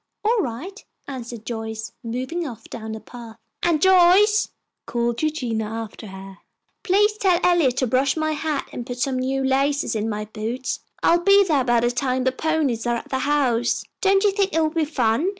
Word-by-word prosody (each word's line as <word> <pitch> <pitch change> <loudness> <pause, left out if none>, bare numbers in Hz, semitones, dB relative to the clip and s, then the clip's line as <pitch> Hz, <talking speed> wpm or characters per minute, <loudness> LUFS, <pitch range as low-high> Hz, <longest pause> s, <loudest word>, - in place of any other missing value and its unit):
"All 455 +2 +3
right," 360 - -5 0.2
answered 240 -4 -7
Joyce, 220 -1 -5
moving 260 +9 -3
off 235 -5 -9
down 220 -1 -6
the 220 - -6
path. 230 -1 -11 0.2
"And 335 -3 +2
Joyce," 380 +4 +5 0.4
called 235 0 -1
Eugenia 245 -9 -1
after 225 -1 -6
her, 190 0 -10 0.4
"please 415 +1 +2
tell 365 -3 +3
Eliot 330 -8 +3
to 260 - +2
brush 260 +5 +1
my 310 0 0
hat 305 -2 -2
and 245 - -4
put 245 -1 -5
some 255 +1 0
new 265 +1 -1
laces 275 0 +1
in 220 +1 -1
my 210 0 -3
boots. 225 +4 -4 0.2
I'll 340 - +5
be 400 +2 +6
there 300 -8 +2
by 240 -2 +3
the 240 +1 +2
time 255 0 -1
the 260 - +2
ponies 275 -5 -1
are 240 - +1
at 235 - -6
the 265 - -1
house. 255 -5 +1 0.2
Don't 390 -1 +3
you 410 - +4
think 390 -4 0
it - - +3
will 310 -1 +1
be 320 -1 0
fun?" 290 +2 +1
265 Hz, 190 wpm, -22 LUFS, 235-330 Hz, 0.4 s, be